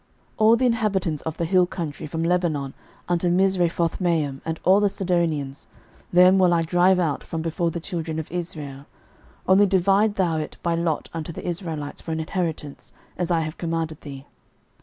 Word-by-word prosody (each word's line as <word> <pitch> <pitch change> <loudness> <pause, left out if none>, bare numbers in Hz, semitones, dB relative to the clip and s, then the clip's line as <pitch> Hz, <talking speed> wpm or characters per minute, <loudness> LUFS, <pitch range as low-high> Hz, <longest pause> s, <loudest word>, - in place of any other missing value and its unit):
06:013:006 - - -35
All 220 +1 +6
the 255 +2 +1
inhabitants 200 - 0
of 160 -1 -5
the 170 - -1
hill 180 +1 +3
country 165 -6 -5
from 160 +2 -3
Lebanon 165 -6 0 0.3
unto 175 0 +1
Misrephothmaim, 170 -5 +1
and 160 0 -4
all 190 +2 +5
the 205 -1 +3
Sidonians, 165 -8 -1 0.4
them 180 +2 +6
will 180 -2 +4
I 165 - +2
drive 180 +3 +3
out 155 -6 -1
from 165 -2 -4
before 165 +1 -1
the 170 - -4
children 165 -1 -4
of 160 -1 -5
Israel: 150 -5 -5 0.6
only 195 +2 +6
divide 195 +3 +3
thou 170 -4 +1
it 155 - -6
by 170 - +1
lot 165 -2 -1
unto 165 0 -4
the 165 - -7
Israelites 165 -4 -4
for 165 - -6
an 160 - -2
inheritance, 160 -3 -4 0.2
as 175 -2 -2
I 170 -2 +2
have 155 0 -5
commanded 165 -2 -3
thee. 140 -2 -9
170 Hz, 180 wpm, -24 LUFS, 160-185 Hz, 0.6 s, All